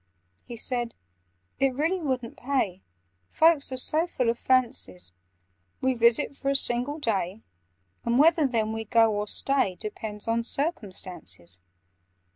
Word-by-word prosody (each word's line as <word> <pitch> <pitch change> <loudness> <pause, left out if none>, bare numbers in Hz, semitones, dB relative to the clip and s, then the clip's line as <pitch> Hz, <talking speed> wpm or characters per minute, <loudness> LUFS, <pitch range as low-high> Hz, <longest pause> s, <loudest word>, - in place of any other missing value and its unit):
He 240 - -8
said 240 0 0 0.6
"It 270 -2 +2
really 325 +7 0
wouldn't 255 -6 -3
pay— 245 -9 -1 0.5
Folk 325 0 +5
are 270 -2 -6
so 310 +6 +2
full 250 -8 0
of 235 - -7
fancies. 95 - +1 0.7
We 260 0 +1
visit 235 +4 +2
for 275 - -2
a 275 - +1
single 255 +2 +2
day, 210 - -2 0.6
And 235 +1 +1
whether 315 0 +5
then 220 -3 -1
we 225 0 -3
go, 225 0 +4
or 210 0 -2
stay, 265 -6 +1
Depends 210 +1 -6
on 230 +1 +1
circumstances. 185 - -2
240 Hz, 135 wpm, -27 LUFS, 215-275 Hz, 0.7 s, Folk